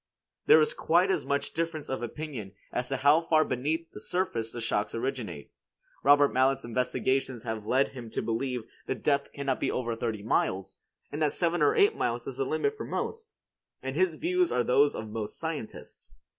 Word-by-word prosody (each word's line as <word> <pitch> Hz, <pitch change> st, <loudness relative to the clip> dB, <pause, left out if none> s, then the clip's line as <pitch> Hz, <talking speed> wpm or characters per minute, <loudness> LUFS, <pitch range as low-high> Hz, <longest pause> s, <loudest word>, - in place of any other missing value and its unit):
There 160 Hz, -, +8 dB
is 155 Hz, -, +2 dB
quite 180 Hz, +4 st, +3 dB
as -, -, 0 dB
much 140 Hz, 0 st, 0 dB
difference 165 Hz, -2 st, -2 dB
of 130 Hz, -, -3 dB
opinion 120 Hz, -5 st, -6 dB, 0.2 s
as 125 Hz, 0 st, -2 dB
to 135 Hz, -, 0 dB
how 145 Hz, +5 st, +5 dB
far 155 Hz, -2 st, +3 dB
beneath 155 Hz, +6 st, -2 dB
the -, -, -9 dB
surface 115 Hz, -12 st, -1 dB
the 120 Hz, -, -6 dB
shocks 105 Hz, -2 st, -1 dB
originate. 120 Hz, -, -4 dB, 0.5 s
Robert 145 Hz, 0 st, +5 dB
Mallet's 130 Hz, 0 st, +2 dB
investigations 125 Hz, 0 st, 0 dB
have 110 Hz, -3 st, -4 dB
led 135 Hz, +2 st, +3 dB
him 125 Hz, -4 st, -9 dB
to -, -, -2 dB
believe 120 Hz, +2 st, -2 dB, 0.2 s
the -, -, 0 dB
depth 140 Hz, -1 st, 0 dB
cannot 140 Hz, -2 st, -2 dB
be -, -, 0 dB
over 120 Hz, -2 st, -1 dB
thirty 115 Hz, -3 st, -3 dB
miles, 95 Hz, -3 st, 0 dB, 0.3 s
and 150 Hz, -, -4 dB
that 150 Hz, -2 st, +2 dB
seven 175 Hz, -1 st, 0 dB
or 145 Hz, -, +4 dB
eight 410 Hz, +2 st, +5 dB
miles -, -, -1 dB
is -, -, -5 dB
the 410 Hz, -, 0 dB
limit 430 Hz, 0 st, 0 dB
for -, -, -6 dB
most, 455 Hz, 0 st, -4 dB, 0.5 s
and 130 Hz, +1 st, -3 dB
his 180 Hz, -1 st, +2 dB
views 360 Hz, +2 st, +1 dB
are 120 Hz, -, +2 dB
those 140 Hz, +4 st, +4 dB
of 110 Hz, -, -5 dB
most 110 Hz, -1 st, -5 dB
scientists. 145 Hz, -, -6 dB
135 Hz, 190 wpm, -29 LUFS, 115-160 Hz, 0.5 s, There